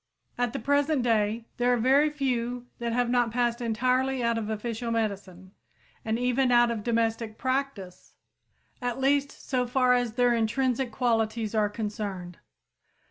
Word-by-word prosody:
At 245 -1 0
the - - -2
present 285 +1 +1
day 225 -1 +1
there 245 0 +2
are 245 - +3
very 270 +6 +4
few 250 -4 -2
that 235 -1 -2
have 245 +1 +1
not 240 -1 +2
passed 240 +1 0
entirely 255 +3 0
out 235 0 +1
of 220 -2 -3
official 225 +2 -3
medicine 200 -5 -3 0.5
and 220 0 -1
even 250 +1 +1
out 240 -1 +5
of 225 -2 -3
domestic 225 -1 -1
practice, 260 -8 -3 0.7
at 245 +1 -2
least 280 +1 +2
so 250 -2 -2
far 250 0 +3
as 245 -2 0
their 245 0 +3
intrinsic 245 +2 0
qualities 225 -2 0
are 210 -2 +2
concerned. 205 -5 -5
240 Hz, 150 wpm, -27 LUFS, 220-250 Hz, 0.7 s, out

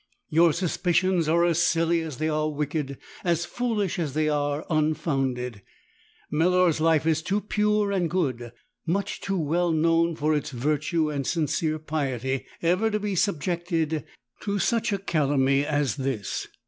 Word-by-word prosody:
Your 165 +2 +5
suspicions 175 0 +1
are 170 +2 +4
as 170 -1 +2
silly 165 -1 +2
as 155 -5 -6
they 155 - -1
are 155 0 0
wicked, 145 -2 -3 0.3
as 170 -1 +1
foolish 215 -5 -1
as 150 -5 -2
they 155 0 +2
are 145 0 -1
unfounded. 135 - -1 0.7
Melor's 175 0 +3
life 160 -1 +3
is 160 -1 +2
too 195 +5 0
pure 210 0 +1
and 180 -4 0
good, 130 -10 -1 0.4
much 195 +4 -1
too 195 0 -1
well 170 +2 +1
known 165 +1 +2
for 155 +1 +1
its 150 0 -1
virtue 150 +4 0
and 140 -2 -3
sincere 155 -1 0
piety, 135 -4 -2 0.2
ever 185 +6 +2
to 210 -1 -1
be 205 -1 -2
subjected 170 -3 0 0.4
to 205 -1 -2
such 225 +4 +1
a 200 - +1
calumny 140 -6 +2
as 145 -2 0
this. 130 -7 -3
160 Hz, 150 wpm, -26 LUFS, 145-175 Hz, 0.7 s, Your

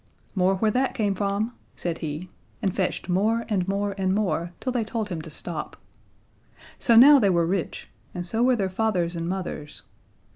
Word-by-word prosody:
"More 190 0 +2
where 215 +3 +1
that 260 +4 0
came 210 -5 +1
from," 200 +4 -1 0.2
said 170 -2 -3
he, 160 +3 -5 0.3
and 190 -2 -1
fetched 185 -2 -1
more 215 +6 +1
and 195 -4 0
more 200 +1 -1
and 190 0 +1
more, 175 -4 0
till 255 - -2
they 245 -2 0
told 220 -1 -3
him 170 -4 -4
to 160 - -9
stop. 160 0 -5 1.0
So 235 - +4
now 280 +5 +9
they 205 -5 +3
were 170 -2 +3
rich, 180 0 -2 0.3
and 175 0 -3
so 225 +6 -1
were 250 +1 +4
their 200 -4 0
fathers 185 -3 0
and 165 0 -3
mothers. 180 -5 -5
195 Hz, 185 wpm, -25 LUFS, 175-220 Hz, 1.0 s, now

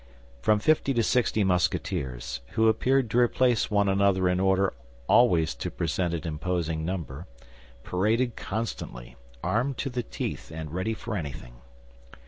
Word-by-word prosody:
From 105 +11 +4
fifty 140 +3 +2
to 115 - +3
sixty 110 -2 +2
Musketeers, 90 -9 -1
who 110 0 +3
appeared 130 +3 +3
to 120 - +3
replace 120 -1 +3
one 105 -2 +2
another 95 -1 +3
in 90 0 +1
order 95 0 +2 0.3
always 90 -10 +4
to - - -4
present 85 0 -1
an 85 - -5
imposing 80 0 -2
number, 85 -2 -4 0.6
paraded 115 +7 +1
constantly, 95 - -5 0.3
armed 125 +3 0
to 135 - -3
the 125 0 -1
teeth - - -5
and 80 -1 -6
ready 95 +5 -1
for 115 0 -5
anything. 65 -8 -6
95 Hz, 140 wpm, -27 LUFS, 85-115 Hz, 0.6 s, From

